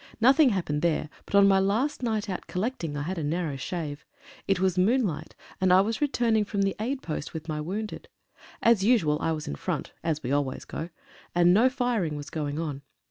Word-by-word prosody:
Nothing 265 +5 +6
happened 170 -8 -1
there, 160 -2 0 0.2
but - - -3
on 200 0 +7
my 195 -1 +5
last 225 +11 0
night 220 -3 -1
out 185 -2 -5
collecting 180 - -3
I 145 - -2
had 175 +3 -3
a - - -3
narrow 155 -1 -1
shave. 150 +1 -5 0.4
It 195 -2 +2
was 185 -1 +2
moonlight, 200 - +1 0.3
and 185 -1 +4
I 185 +1 +7
was 225 +6 -2
returning 235 -6 +2
from 200 -1 -1
the 195 0 0
aid 260 +5 -2
post 155 0 -5
with 160 0 -6
my 155 -1 -2
wounded. 210 +7 -5 0.6
As 230 -4 +5
usual, 195 -10 +3
I 165 - +1
was 155 -1 -4
in - - -3
front 70 - -3
(as 155 -2 -1
we 125 - -2
always 140 -2 -1
go), 165 - -5 0.5
and 175 0 +5
no 235 +6 +5
firing 245 - -1
was 145 +1 -7
going 150 -3 -3
on. 150 -4 -3
185 Hz, 205 wpm, -27 LUFS, 155-220 Hz, 0.6 s, on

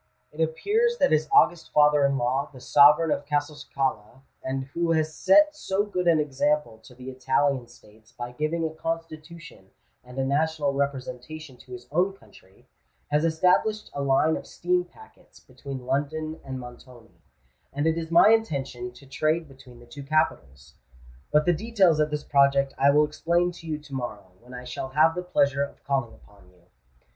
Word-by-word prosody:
It 150 - -6
appears 425 - +1
that 275 - +2
his 155 0 +1
august 175 -2 +3
father 150 -1 +4
in 140 0 -1
law, 130 +3 -1
the 130 - -13
sovereign 150 +5 +5
of 145 - -1
Castelcicala,—and 135 -3 -4
who 170 -1 0
has 155 -1 0
set 300 - +4
so 200 -8 -1
good 180 -4 -3
an 165 -2 +4
example 145 -4 -1
to 125 - -15
the 130 +1 -9
Italian 130 0 0
States 110 -2 -20
by 120 0 -7
giving 155 +5 -2
a 160 - -2
Constitution 165 - -7 0.3
and 125 +1 -13
a 135 - 0
national 145 +1 0
representation 140 +1 -5
to 125 - -14
his 125 0 -10
own 180 +5 +1
country,—has 145 - -8
established 180 +6 +1
a 140 - -4
line 140 +3 +2
of - - -10
steam 180 +1 -1
packets 440 - -19
between 135 -3 -9
London 155 +4 -2
and 130 -1 -6
Montoni; 120 -6 -14 0.5
and 145 +2 -2
it 160 0 +2
is 165 -1 -5
my 170 +5 +6
intention 135 - -1
to 130 +3 -16
trade 155 +4 -1
between 130 -3 -16
the 120 - -15
two 120 +4 -11
capitals. 75 - -2 0.6
But 150 0 +3
the 175 - +3
details 190 -4 +2
of 150 0 +2
this 150 -1 -4
project 140 -1 +2
I 140 - +3
will 150 +1 +4
explain 170 +4 0
to 170 -1 -13
you 155 -1 -2
to 150 -2 -14
morrow, 105 -7 -6
when 125 +2 -13
I 125 - -8
shall 125 +1 -6
have 155 +4 +3
the 180 - -4
pleasure 140 -6 +1
of 140 - -5
calling 135 -5 -2
upon 100 -3 -22
you. 90 -1 -26
145 Hz, 175 wpm, -25 LUFS, 130-160 Hz, 0.6 s, my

